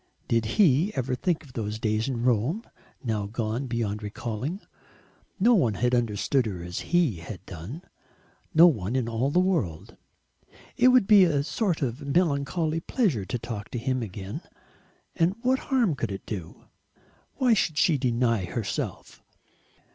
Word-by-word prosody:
Did 115 -1 +1
he 175 0 +4
ever 130 -1 -1
think 165 +5 -1
of 135 -4 -16
those 110 -2 -3
days 110 0 0
in 120 -3 -2
Rome 125 - +1 0.4
gone 110 +1 -2
now 135 - -5
beyond 115 -3 -2
recalling? 115 - -4 0.8
No 235 +6 +5
one 125 - +3
had 125 +3 0
understood 120 +2 +1
her 90 -5 -5
as 90 0 -5
he 170 - +2
had 90 +3 -9
done; 100 - -8 0.7
no 165 +2 +8
one 115 - +2
in 130 -3 0
all 115 +4 0
the 145 - 0
world. 160 - -1 0.8
It 250 - +4
would 255 -4 +6
be 205 -1 +7
a 150 -5 +2
sort 165 +1 -1
of 125 +2 -2
melancholy 155 +1 0
pleasure 165 - 0
to 120 - -3
talk 110 -3 -6
to - - -4
him 130 +2 -1
again, 100 -2 -6 0.7
and 170 +4 +2
what 260 +1 +2
harm 245 - +3
could 115 -6 -3
it 95 - -6
do? 90 -7 -7 0.7
Why 250 -3 +3
should 160 -7 +1
she 165 -5 +3
deny 115 -5 +1
herself? 110 +2 -4
125 Hz, 155 wpm, -26 LUFS, 110-165 Hz, 0.8 s, no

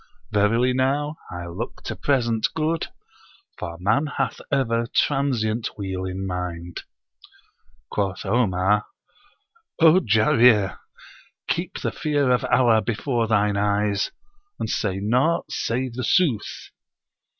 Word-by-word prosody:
Verily 115 +5 +3
now, 145 +4 0
I 90 0 -6
look 90 +8 -6
to - - -4
present 120 -5 +1
good, 160 +1 0 0.7
for 85 0 -5
man 110 +11 +2
hath - - -1
ever 115 -4 +1
transient 120 -6 0
weal 95 -2 -4
in 95 +1 -4
mind.' 90 -2 -5 1.1
Quoth 95 -2 -2
Omar, 105 -2 +2 0.9
"O 165 +2 +7
Jarir! 110 - +4 0.7
keep 175 +2 -2
the - - -1
fear 145 -4 0
of 125 +1 +2
Allah 120 -3 +4
before 115 +2 -1
thine 105 -2 +2
eyes, 105 0 +1 0.5
and - - -3
say 95 -3 -1
naught 125 +11 +1
save 125 +1 -2
the 130 +1 -4
sooth." 140 - 0
115 Hz, 115 wpm, -23 LUFS, 100-130 Hz, 1.1 s, O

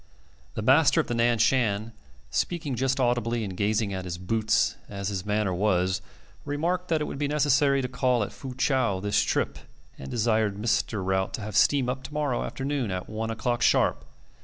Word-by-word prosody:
The 110 - -3
master 140 +5 +5
of - - +2
the - - -3
Nan 120 0 +2
Shan, 110 -2 +1 0.4
speaking 165 -6 -1
just 130 +2 0
audibly 120 -2 +1
and 95 -3 -5
gazing 105 +1 0
at 95 -1 -4
his 85 -1 -4
boots 110 +4 +1
as 100 -1 -4
his 100 -1 -4
manner 105 -2 0
was, 90 -1 +1 0.4
remarked 170 +6 -1
that 160 -2 +1
it - - +1
would 140 - -5
be 145 - 0
necessary 140 -2 +2
to - - -1
call 125 -2 +1
at - - -5
Fu 130 -2 -8
chau 130 -8 +1
this 100 +1 +1
trip, - - -1 0.4
and 65 - -7
desired 110 -3 +1
Mr. 110 -2 0
Rout 95 0 0
to - - -7
have 105 -1 -6
steam 140 -3 +4
up 130 +1 -2
to - - -9
morrow 145 -5 0
afternoon 135 -3 -2
at 90 -1 -4
one 110 +1 -3
o'clock 120 +2 -1
sharp. - - +3
115 Hz, 190 wpm, -26 LUFS, 100-135 Hz, 0.4 s, master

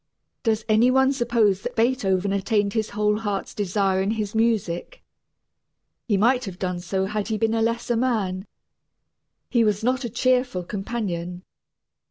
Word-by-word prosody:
Does 220 -1 0
any 220 +3 +4
one 265 +1 +4
suppose 230 -6 +2
that - - -5
Beethoven 205 -5 +1
attained 200 0 0
his 220 -1 -1
whole 210 0 0
heart's 205 -3 -3
desire 195 -1 0
in 195 - 0
his 215 -2 -2
music? 220 - -1 1.0
He 205 -4 +2
might 245 +5 +3
have 190 -3 -7
done 180 -2 -2
so 190 +2 -1
had 210 +1 -3
he 220 -1 -1
been 225 0 +1
a 225 - +1
lesser 235 +1 0
man. 215 -6 -1 1.0
He 235 -2 +4
was 210 0 +1
not 255 +3 +1
a 240 - -3
cheerful 250 -5 +1
companion. 180 -3 -4
215 Hz, 155 wpm, -24 LUFS, 195-235 Hz, 1.0 s, any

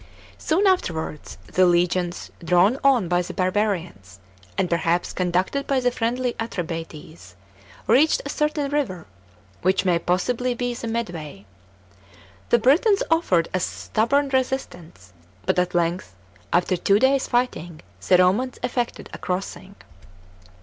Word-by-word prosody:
Soon 355 +6 +1
afterwards, 165 - -1
the 185 0 +3
legions, 175 0 0
drawn 180 +9 +3
on 260 -9 +4
by 175 +1 +2
the 175 - -7
barbarians, 185 - -2 0.4
and 190 -2 +1
perhaps 170 0 0
conducted 185 +9 -1
by 275 -1 +2
the 245 -1 +1
friendly 245 +1 -1
Atrebates, 165 - -6 0.5
reached 275 +8 +4
a - - -4
certain 300 -1 -1
river, 220 - -2 0.6
which 190 +2 +1
may 175 -2 +3
possibly 240 +9 0
be 245 0 -2
the 235 -1 -6
Medway. 170 - -5 1.0
The - - +5
Britons 310 - +3
offered 185 - +2
a 185 - +1
stubborn 270 +10 0
resistance, 180 - -3 0.3
but - - +2
at 180 0 -1
length, 170 - -1 0.4
after 180 +1 +2
two 195 +3 +3
days' 265 +3 +2
fighting, 175 -10 -2 0.3
the 180 - +6
Romans 195 +9 +2
effected 245 -1 -2
a - - -7
crossing. 190 +1 -5
190 Hz, 130 wpm, -23 LUFS, 175-255 Hz, 1.0 s, the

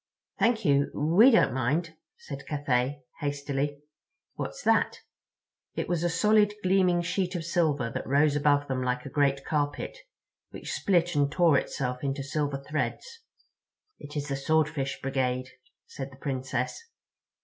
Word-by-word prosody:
"Thank 230 -1 +2
you, 140 -1 +3
we 170 - +6
don't 225 - +4
mind," 150 +7 0 0.2
said 140 -2 -9
Cathay 140 -1 -1 0.2
hastily. 145 -1 -2 0.5
"What's - - -6
that?" - - +2 0.7
It - - -2
was 175 -2 0
a 175 - +2
solid, 210 +3 +3
gleaming 185 -2 +3
sheet 180 +1 -1
of 165 -2 -3
silver 155 -8 +1
that - - -5
rose 145 +2 +3
above 145 -1 +2
them 130 -1 -1
like 125 0 -1
a - - -5
great 140 -2 +1
carpet—which 155 - -5
split 175 -2 +2
and 145 -1 +2
tore 170 -2 +4
itself 125 -1 -4
into 135 0 -2
silver 145 0 -1
threads. 460 - -3 0.8
"It 145 +1 -8
is 145 0 -3
the 140 - -2
Swordfish 150 -1 0
Brigade," 130 -1 -1 0.4
said 135 0 -7
the 130 - -15
Princess. 130 - -3
145 Hz, 140 wpm, -28 LUFS, 135-175 Hz, 0.8 s, we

